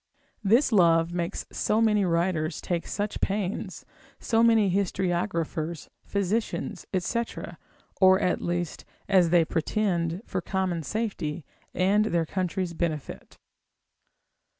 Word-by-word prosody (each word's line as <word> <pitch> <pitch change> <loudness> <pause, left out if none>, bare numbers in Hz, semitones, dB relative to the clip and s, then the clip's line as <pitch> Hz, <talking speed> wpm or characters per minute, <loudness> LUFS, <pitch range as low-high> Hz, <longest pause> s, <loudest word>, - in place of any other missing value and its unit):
This 235 +7 +4
love 170 -4 +4
makes 175 +1 -3
so 215 - +1
many 210 -3 +3
writers 170 -2 0
take 170 -2 -3
such 205 0 -3
pains, 200 0 -2 0.3
so 225 -1 +1
many 225 -4 +4
historiographers, 175 -4 -1
physicians, 200 +3 -2
&c., 230 +6 0 0.7
or 190 -1 +6
at 180 - 0
least, 175 -2 -3 0.2
as 185 -4 +4
they 170 -1 +4
pretend, 175 +1 -1
for - - -3
common 190 -3 -1
safety, 170 -5 -3 0.3
and 200 +4 +3
their 170 -6 +1
country's 185 0 -2
benefit. 160 -4 -4
185 Hz, 110 wpm, -27 LUFS, 170-205 Hz, 0.7 s, or